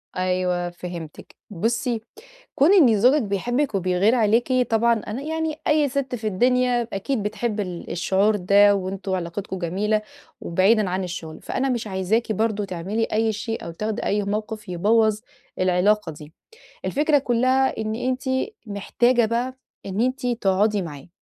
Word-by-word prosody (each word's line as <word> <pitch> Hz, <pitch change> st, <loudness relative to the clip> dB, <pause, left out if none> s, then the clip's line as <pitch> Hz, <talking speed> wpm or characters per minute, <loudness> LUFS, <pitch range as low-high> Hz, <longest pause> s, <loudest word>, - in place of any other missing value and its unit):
أيوه 180 Hz, -1 st, 0 dB
فهمتِك. 175 Hz, -2 st, -9 dB
بُصّي، 225 Hz, +4 st, -1 dB, 0.5 s
كون 300 Hz, +8 st, +5 dB
إن 255 Hz, -, +5 dB
زوجِك 260 Hz, +7 st, +5 dB
بيحبِك 240 Hz, +5 st, -1 dB
وبيغير 185 Hz, +4 st, +2 dB
عليكِ، 230 Hz, +2 st, +2 dB, 0.2 s
طبعًا 230 Hz, +1 st, +3 dB
أنا 220 Hz, +6 st, -4 dB
يعني 320 Hz, +1 st, -2 dB
أي 300 Hz, -1 st, +3 dB
سِتْ 260 Hz, -1 st, -2 dB
في 220 Hz, -2 st, -4 dB
الدنيا، 245 Hz, +3 st, +2 dB
أكيد 210 Hz, +3 st, -2 dB
بتحب 215 Hz, +1 st, -2 dB
ال 180 Hz, -4 st, -5 dB
الشعور 195 Hz, +4 st, +2 dB
ده، 200 Hz, +1 st, +5 dB
وأنتم 195 Hz, 0 st, -3 dB
علاقتكم 185 Hz, +2 st, -4 dB
جميلة، 205 Hz, +5 st, 0 dB, 0.4 s
وبعيدًا 195 Hz, +4 st, +2 dB
عن 185 Hz, +1 st, -1 dB
الشغل. 170 Hz, -3 st, -6 dB
فأنا 270 Hz, +1 st, -2 dB
مش 240 Hz, -4 st, -2 dB
عايزاكِ 200 Hz, +4 st, 0 dB
برضه 215 Hz, -1 st, 0 dB
تعملي 195 Hz, +5 st, -3 dB
أي 220 Hz, 0 st, 0 dB
شيء، 225 Hz, +2 st, -4 dB
أو -, -, -5 dB
تاخدي 215 Hz, +5 st, -3 dB
أي 205 Hz, +1 st, +1 dB
موقف، 215 Hz, +1 st, -4 dB
يبوّظ 215 Hz, +4 st, +2 dB, 0.4 s
العلاقة 185 Hz, +1 st, +2 dB
دي. 150 Hz, 0 st, -12 dB, 0.5 s
الفكرة 295 Hz, +1 st, +2 dB
كلها 260 Hz, +1 st, +1 dB
إن 220 Hz, 0 st, -2 dB
أنتِ 255 Hz, +2 st, -2 dB, 0.4 s
محتاجة 240 Hz, +4 st, +1 dB
بقى 240 Hz, +3 st, -2 dB, 0.3 s
إن 195 Hz, +2 st, -3 dB
أنتِ 255 Hz, +1 st, 0 dB
تقعدي 210 Hz, -3 st, +1 dB
معاه. 145 Hz, -4 st, -9 dB
215 Hz, 145 wpm, -23 LUFS, 185-240 Hz, 0.5 s, كون